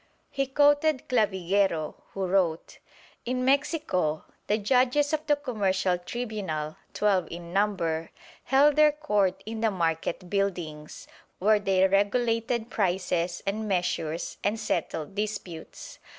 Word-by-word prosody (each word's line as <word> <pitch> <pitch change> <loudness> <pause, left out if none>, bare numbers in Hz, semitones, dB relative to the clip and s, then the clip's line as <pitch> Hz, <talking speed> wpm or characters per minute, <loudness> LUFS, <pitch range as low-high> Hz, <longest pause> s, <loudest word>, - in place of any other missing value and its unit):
He 275 0 -1
quoted 290 +1 +3
Clavigero, 190 -7 +1 0.2
who 195 -1 -1
wrote: 180 -3 0 0.4
"In 255 +1 -1
Mexico 270 - +1 0.2
the 210 - +2
judges 255 +7 +2
of 310 0 0
the 295 - +4
commercial 195 -9 0
tribunal, 185 -8 -4 0.2
twelve 195 -5 +1
in 170 0 -8
number, 175 -6 0 0.4
held 280 +3 +4
their 305 0 +7
court 205 -11 0
in 220 0 -5
the 225 - +3
market 170 -1 -2
buildings, 175 -6 -3 0.3
where 210 +2 +3
they 190 -1 +3
regulated 230 +4 +1
prices 180 -3 -1
and 215 +2 -2
measures 175 -4 -2
and 210 +2 0
settled 165 -5 -2
disputes. 200 -5 -6
200 Hz, 120 wpm, -27 LUFS, 175-245 Hz, 0.4 s, their